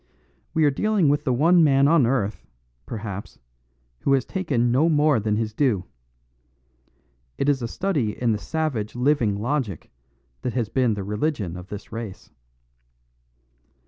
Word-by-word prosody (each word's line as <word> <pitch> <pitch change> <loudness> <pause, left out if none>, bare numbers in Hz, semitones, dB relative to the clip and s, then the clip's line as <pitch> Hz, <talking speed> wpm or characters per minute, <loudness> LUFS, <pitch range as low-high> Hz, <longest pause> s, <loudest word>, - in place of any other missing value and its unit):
We 160 -1 +4
are 145 - +4
dealing 205 +1 +2
with 145 +2 +1
the 130 - +2
one 165 +7 +4
man 140 -2 +4
on 150 -6 +4
earth, 110 -5 -1 0.4
perhaps, 105 -3 -6 0.6
who 140 - +1
has 135 - +2
taken 140 - 0
no 145 +7 +3
more 150 -4 +3
than 105 0 0
his 110 0 -2
due. 110 -8 +1 1.5
It 140 - -1
is 140 -3 +2
a 120 - -2
study 140 - -1
in 120 -2 +2
the 105 - -1
savage 130 -8 -2
living 125 -5 +2
logic 120 - -3 0.5
that 125 - -3
has 120 -5 -1
been 125 -4 +1
the 100 - -4
religion 105 - -2
of 90 +1 -9
this 105 0 -9
race. 110 -4 -7
125 Hz, 150 wpm, -24 LUFS, 105-150 Hz, 1.5 s, We